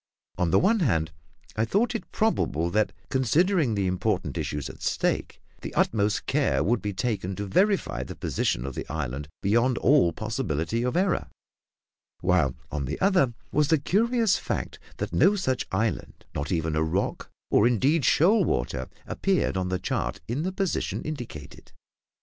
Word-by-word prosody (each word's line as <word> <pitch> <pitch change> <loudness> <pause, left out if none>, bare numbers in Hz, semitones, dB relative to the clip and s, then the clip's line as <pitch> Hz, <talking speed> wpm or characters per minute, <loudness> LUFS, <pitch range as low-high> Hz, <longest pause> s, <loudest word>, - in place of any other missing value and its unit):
On 90 - +2
the - - +4
one 220 +4 +3
hand, 85 - +1 0.4
I 110 - +1
thought 210 - +1
it 230 - -5
probable 85 - 0
that, 110 +2 +2 0.2
considering 145 - +2
the 100 -1 0
important 90 -1 -1
issues 75 -2 -3
at - - -11
stake, - - -1 0.2
the - - -7
utmost 105 -1 +1
care - - +1
would 110 +6 +1
be 105 - -2
taken 100 -3 -2
to 100 - -4
verify 195 - +1
the - - -7
position - - -1
of 70 - -4
the - - -6
island 75 -2 -3 0.2
beyond 120 +5 +2
all 130 - +4
possibility 105 -1 -2
of 125 +6 0
error; 185 0 +1 0.9
while, 85 -7 +2 0.2
on 75 -2 -2
the - - -4
other, 180 - +3 0.2
was 150 0 +2
the 160 - +4
curious 225 - +2
fact - - -4 0.2
that - - -4
no 205 - +5
such 130 -11 -1
island 110 +4 -2
not 70 +1 -3
even 80 -3 0
a 80 - +1
rock, 80 +5 -1 0.2
or 105 - +5
indeed 135 +7 +2
shoal 190 - +4
water 65 - -1 0.2
appeared 195 - 0
on 90 -1 -1
the 90 - 0
chart - - -2
in 125 +6 -2
the 185 +3 -1
position 190 -1 -2
indicated. 120 - -8
115 Hz, 165 wpm, -26 LUFS, -, 0.9 s, no